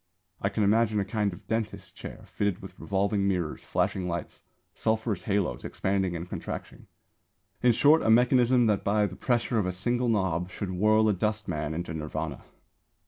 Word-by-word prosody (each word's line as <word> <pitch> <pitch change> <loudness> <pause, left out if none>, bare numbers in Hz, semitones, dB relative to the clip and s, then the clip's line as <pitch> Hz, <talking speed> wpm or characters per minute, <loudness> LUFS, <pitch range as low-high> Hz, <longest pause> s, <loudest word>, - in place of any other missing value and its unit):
I - - +1
can 110 - 0
imagine 110 +1 +3
a 100 - 0
kind 105 0 0
of 90 - -12
dentist's 110 -1 -3
chair - - -9
fitted 100 -3 -1
with - - -10
revolving 100 0 0
mirrors, 90 -5 -1
flashing 90 -2 -1
lights, 85 0 -5 0.3
sulphurous 110 -3 -1
haloes 100 - 0
expanding 95 -2 -1
and 85 +1 -5
contracting - - -7 0.7
in 125 -1 +5
short 150 +7 +5
a - - +1
mechanism 125 +1 +5
that 105 -3 +1
by 105 +1 +2
the 95 -2 -5
pressure 120 0 0
of 95 - 0
a - - 0
single 120 +7 0
knob 95 -5 0
should 95 0 -5
whirl 110 +4 +3
a 105 - +4
dustman 90 -7 -2
into 85 -1 -4
Nirvāna. 75 -1 -4
100 Hz, 170 wpm, -28 LUFS, 90-110 Hz, 0.7 s, in